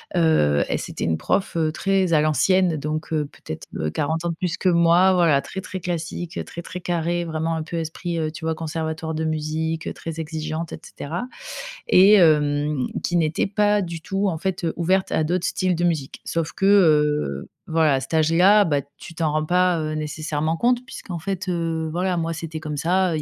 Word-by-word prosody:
heu, 115 - +3
et - - 0
c'était - - -4
une 80 -1 +1
prof, 195 - -1
heu, 160 -2 +1
très 190 +1 +1
à 155 - +5
l'ancienne 175 +3 +3
donc, 155 +2 -4
heu, 150 -1 +1
peut-être, 80 - -9
heu, 75 - -1
40 160 - -2
ans 170 - +1
de 170 - -3
plus 180 -1 -2
que 185 - +2
moi 170 +2 +5
voilà 165 -6 +4
très, 190 - -6
très 190 0 -6
classique, 175 -1 -4
très, 170 - -8
très 180 +1 -8
carrée, 175 0 -1
vraiment 160 0 -2
un 160 - -3
peu 170 +2 -5
esprit, 165 +1 -4
heu, 155 -1 -1
tu 160 +1 -10
vois 160 0 0
conservatoire 160 0 -4
de 160 0 -2
musique, 160 +1 -2
très 165 -1 -7
exigeante 160 0 -4
et - - -7
cetera, 170 +10 -5 0.6
et 195 +3 +7
hem, 150 -5 +3 0.2
qui 175 - -1
n'était 160 0 +1
pas 210 +1 +2
du 170 -3 -5
tout 195 +3 -1
en 165 -4 -1
fait, 180 0 -2
heu, 165 - 0
ouverte 185 +3 +1
à 160 - +2
d'autres 175 +3 0
styles 185 -2 0
de 175 - -2
musique. 155 -6 -2
Sauf 165 -2 -2
que 195 - -1
heu, 150 - +3 0.2
voilà 160 -2 +3
à - - +1
cet - - -8
âge-là, 175 +7 +5
bah, 145 -3 +1 0.2
tu 165 - -11
t'en 160 -2 0
rends 155 +1 0
pas, 180 0 +2
heu, 155 0 -2
nécessairement 155 +1 -2
compte 245 +3 +2
puisqu'en 180 -9 -7
fait, 190 +2 -4
heu, 165 -2 -1
voilà 180 +1 0
moi 165 0 -1
c'était 160 0 -6
comme 150 -1 -5
ça, 180 +3 +1
heu, - - 0
il - - -3
165 Hz, 210 wpm, -23 LUFS, 155-180 Hz, 0.6 s, et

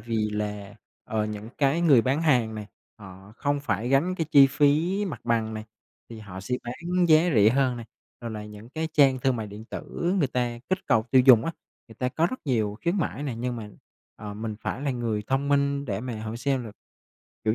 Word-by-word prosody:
vì 110 -2 -1
là, 105 -1 -4 0.3
ờ, 110 -1 -1
những 105 +1 -6
cái 140 +3 +2
người 145 -9 +5
bán 135 +6 0
hàng 125 -8 +2
này 105 -1 -6 0.3
họ 95 0 -13
không 145 -1 -1
phải 115 -3 -2
gánh 140 +8 +2
cái 165 -3 -2
chi 140 -2 +8
phí 155 +8 +2
mặt 180 -7 -5
bằng 115 -2 0
này 110 0 -6 0.4
thì 115 - -9
họ 100 -3 -9
sẽ 110 +6 -2
bán 175 +9 -1
giá 160 +3 +5
rẻ 105 0 +6
hơn 130 -1 +1
này, 115 -1 -8 0.3
rồi 120 -1 -5
là 105 -1 -6
những 105 +1 -11
cái 160 +3 -3
trang 140 -4 +4
thương 130 -1 +1
mại 110 -2 -4
điện 105 +2 -10
tử 170 +9 -3
người 145 -7 +2
ta 120 -1 -2
kích 185 - +1
cầu 115 -5 +3
tiêu 130 -1 +6
dùng 120 -4 +8
á, 165 - -2 0.4
người 115 - -13
ta 125 +3 -1
có 160 +6 +1
rất 255 - -6
nhiều 110 -5 0
khuyến 175 +3 +1
mãi 160 -5 -2
nè. 135 -5 -3
Nhưng 125 0 -2
mà, 105 -2 -7 0.5
ờ, 105 -1 -7
mình 110 0 -5
phải - - -4
là 145 - 0
người 115 -4 -2
thông 135 +2 0
minh 140 0 +1
để 100 -5 -3
mà 115 -3 -5
hỏi 110 +1 -5
xem 135 0 -1
là, 110 - -8 0.7
kiểu 110 0 +2
120 Hz, 225 wpm, -26 LUFS, 110-140 Hz, 0.7 s, chi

